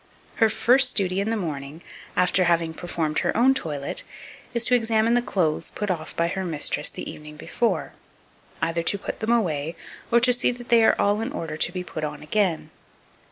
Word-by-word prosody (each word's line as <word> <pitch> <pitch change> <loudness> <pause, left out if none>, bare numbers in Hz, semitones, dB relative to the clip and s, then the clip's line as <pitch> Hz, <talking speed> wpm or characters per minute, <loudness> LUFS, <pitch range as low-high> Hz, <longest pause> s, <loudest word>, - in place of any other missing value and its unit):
Her 225 - +4
first 250 +4 +4
duty 190 -2 +1
in 205 - -2
the 225 - 0
morning, 155 -4 -5 0.3
after 180 0 +3
having 165 -1 +1
performed 160 -2 -2
her - - -1
own 255 +3 +5
toilet, 145 - -3 0.5
is 235 -1 0
to - - +3
examine 225 -1 +3
the 245 - +3
clothes 170 -9 -1
put 210 -2 -1
off 160 -3 -5
by 170 - +1
her 190 +2 -3
mistress 160 -5 0
the - - -7
evening 150 0 -9
before, 235 +8 -1 0.7
either 165 0 0
to 185 +4 +1
put - - -6
them 220 +1 -1
away, 165 -9 0 0.4
or 235 - +6
to 250 +1 +4
see 245 - +3
that 240 0 -12
they 235 -2 +5
are - - +5
all 205 +2 +2
in 225 - -3
order 160 -2 -5
to 180 +3 -1
put 155 -3 -6
on 150 - -5
again. 180 +1 0
185 Hz, 195 wpm, -24 LUFS, 160-225 Hz, 0.7 s, or